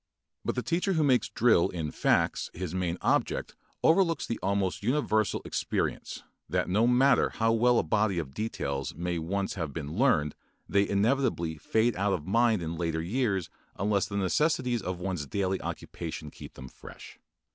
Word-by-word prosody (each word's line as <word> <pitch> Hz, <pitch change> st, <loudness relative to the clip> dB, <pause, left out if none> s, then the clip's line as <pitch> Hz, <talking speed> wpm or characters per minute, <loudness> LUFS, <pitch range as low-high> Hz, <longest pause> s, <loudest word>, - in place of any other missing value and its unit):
But -, -, -2 dB
the 125 Hz, -, -2 dB
teacher 180 Hz, +4 st, 0 dB
who 160 Hz, -3 st, +2 dB
makes 130 Hz, -4 st, +3 dB
drill 115 Hz, -7 st, +3 dB
in 85 Hz, -3 st, -4 dB
the 75 Hz, -, -4 dB
facts -, -, +1 dB
his 90 Hz, -1 st, -4 dB
main 90 Hz, -2 st, -1 dB
object -, -, 0 dB, 0.3 s
overlooks 165 Hz, 0 st, +3 dB
the 115 Hz, -, -3 dB
almost 95 Hz, -1 st, 0 dB
universal 110 Hz, -3 st, +1 dB
experience -, -, -2 dB, 0.3 s
that -, -, 0 dB
no 105 Hz, +6 st, +3 dB
matter 125 Hz, +2 st, +4 dB
how 115 Hz, 0 st, +1 dB
well 120 Hz, +1 st, +4 dB
a -, -, +3 dB
body 100 Hz, +3 st, +1 dB
of 70 Hz, -6 st, -4 dB
details 70 Hz, -9 st, -3 dB
may 85 Hz, +1 st, -2 dB
once 95 Hz, +4 st, -2 dB
have 80 Hz, -7 st, -4 dB
been 75 Hz, -2 st, -5 dB
learned 75 Hz, -2 st, +2 dB, 0.3 s
they 100 Hz, 0 st, +2 dB
inevitably 100 Hz, -, +1 dB
fade 110 Hz, +7 st, +1 dB
out 100 Hz, +1 st, +1 dB
of 80 Hz, -5 st, -3 dB
mind 110 Hz, -1 st, +2 dB
in 80 Hz, +1 st, -4 dB
later 80 Hz, -1 st, -1 dB
years 100 Hz, -2 st, -1 dB, 0.3 s
unless 100 Hz, 0 st, +1 dB
the 100 Hz, -, -4 dB
necessities 125 Hz, -, +1 dB
of 90 Hz, -1 st, -4 dB
one's 90 Hz, -5 st, -3 dB
daily 95 Hz, +2 st, -1 dB
occupation 80 Hz, -3 st, -6 dB
keep -, -, -12 dB
them 65 Hz, -, -9 dB
fresh. -, -, -13 dB
100 Hz, 170 wpm, -28 LUFS, 85-120 Hz, 0.3 s, matter